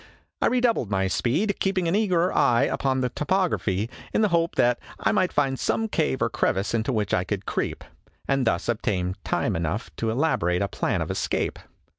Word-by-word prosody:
I -, -, +4 dB
re 250 Hz, +1 st, +2 dB
doubled 230 Hz, -, +1 dB
my 95 Hz, -1 st, +1 dB
speed, 165 Hz, -, 0 dB
keeping 190 Hz, -3 st, 0 dB
an 165 Hz, -, +1 dB
eager 185 Hz, -4 st, +2 dB
eye 120 Hz, +2 st, +4 dB
upon 130 Hz, -1 st, 0 dB
the 125 Hz, -, 0 dB
topography 150 Hz, -, 0 dB, 0.2 s
in -, -, +1 dB
the 210 Hz, -, +3 dB
hope 170 Hz, -1 st, +1 dB
that 120 Hz, 0 st, +3 dB, 0.2 s
I -, -, +2 dB
might 185 Hz, -4 st, +2 dB
find 135 Hz, -2 st, 0 dB
some 225 Hz, -, 0 dB
cave 155 Hz, -, 0 dB
or 115 Hz, -, +1 dB
crevice 95 Hz, +4 st, 0 dB
into 115 Hz, +3 st, 0 dB
which 105 Hz, -5 st, -1 dB
I 90 Hz, -, +2 dB
could 100 Hz, +1 st, -4 dB
creep -, -, -2 dB, 0.4 s
and 135 Hz, -3 st, +1 dB
thus 85 Hz, -, 0 dB
obtain 95 Hz, -6 st, -1 dB
time -, -, 0 dB
enough 85 Hz, +7 st, -3 dB
to 115 Hz, -, -1 dB
elaborate 110 Hz, -, +1 dB
a -, -, 0 dB
plan -, -, -1 dB
of -, -, -4 dB
escape. -, -, -1 dB
130 Hz, 195 wpm, -25 LUFS, -, 0.4 s, I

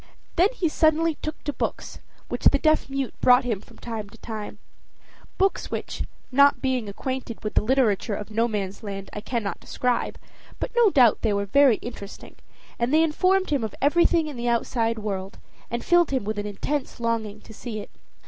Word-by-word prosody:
Then 360 Hz, +3 st, +5 dB
he 345 Hz, -, +1 dB
suddenly 315 Hz, +1 st, +3 dB
took 310 Hz, 0 st, -5 dB
to 290 Hz, -, -2 dB
books, -, -, -4 dB, 0.3 s
which -, -, -5 dB
the -, -, +6 dB
deaf 310 Hz, -3 st, +2 dB
mute 270 Hz, -2 st, -2 dB
brought 250 Hz, +1 st, +6 dB
him 225 Hz, -6 st, -2 dB
from 230 Hz, -, -18 dB
time 220 Hz, -3 st, -6 dB
to 230 Hz, -, -15 dB
time 215 Hz, -2 st, -7 dB, 0.8 s
books 390 Hz, +1 st, +1 dB
which, -, -, -4 dB, 0.3 s
not 280 Hz, +2 st, +5 dB
being 255 Hz, -5 st, -1 dB
acquainted 255 Hz, +2 st, -5 dB
with 215 Hz, -, -3 dB
the -, -, +3 dB
literature 225 Hz, -3 st, +1 dB
of 210 Hz, +1 st, -7 dB
Nomansland, 200 Hz, -3 st, -2 dB
I 210 Hz, -, -5 dB
cannot 210 Hz, -5 st, -3 dB
describe, 250 Hz, -1 st, -1 dB, 0.4 s
but -, -, -4 dB
no 475 Hz, -3 st, +6 dB
doubt 250 Hz, -, +5 dB
they 220 Hz, -3 st, +1 dB
were 200 Hz, 0 st, 0 dB
very 270 Hz, +3 st, +5 dB
interesting; 205 Hz, -4 st, -9 dB, 0.4 s
and 235 Hz, +2 st, +1 dB
they 315 Hz, +2 st, +5 dB
informed 370 Hz, +3 st, +2 dB
him 280 Hz, -5 st, +1 dB
of 220 Hz, -, -4 dB
everything 335 Hz, +2 st, +3 dB
in 295 Hz, -4 st, -6 dB
the 240 Hz, 0 st, -1 dB
outside 230 Hz, -1 st, 0 dB
world, 195 Hz, -2 st, -4 dB, 0.3 s
and 235 Hz, +1 st, -4 dB
filled 345 Hz, -1 st, +4 dB
him 265 Hz, -4 st, 0 dB
with 210 Hz, +1 st, -3 dB
an 205 Hz, -, -3 dB
intense 265 Hz, +7 st, -3 dB
longing 225 Hz, -3 st, -2 dB
to 220 Hz, -, -13 dB
see 220 Hz, 0 st, -6 dB
it. 205 Hz, -, -9 dB
235 Hz, 185 wpm, -25 LUFS, 215-285 Hz, 0.8 s, the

